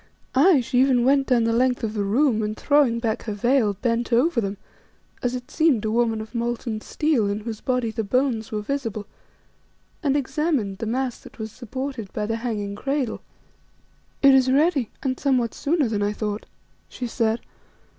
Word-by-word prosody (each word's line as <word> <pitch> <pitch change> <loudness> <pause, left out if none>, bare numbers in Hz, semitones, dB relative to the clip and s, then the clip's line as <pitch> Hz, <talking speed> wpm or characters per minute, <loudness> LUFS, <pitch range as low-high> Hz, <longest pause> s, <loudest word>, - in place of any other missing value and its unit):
Aye, 290 +2 +5
she 245 +1 0
even 255 -2 +4
went 275 0 +3
down 245 -3 +3
the 230 0 +1
length 250 +1 +1
of 215 -1 -1
the 210 -2 -1
room 225 +3 +2
and, 215 0 -3
throwing 285 -5 +3
back 230 0 -1
her 215 - -3
veil, 230 -1 +2
bent 235 0 0
over 245 +2 +3
them, 200 -1 -3 0.6
as 245 0 -1
it 250 0 -7
seemed 310 -9 +2
a 215 - 0
woman 225 -1 +1
of 220 +2 -10
molten 235 -2 -2
steel 295 -8 +1
in 205 +1 -2
whose 220 -1 -6
body 250 -3 0
the 225 0 -2
bones 230 0 0
were 210 -1 -2
visible, 225 -5 -3 1.0
and 285 -3 +2
examined 280 - -1
the 225 - -3
mass 250 +2 -2
that - - -15
was 220 -1 -5
supported 255 -2 -6
by 210 - -2
the 225 +1 -1
hanging 215 -4 -3
cradle. 270 +1 -2 1.0
"It 275 -1 +8
is 260 -1 +4
ready 285 -3 +2
and 260 -2 -1
somewhat 255 -5 +1
sooner 295 -2 +1
than 210 -2 -1
I 205 +1 0
thought," 210 0 -4 0.4
she 250 - -5
said. 230 -1 0
240 Hz, 185 wpm, -24 LUFS, 220-265 Hz, 1.0 s, It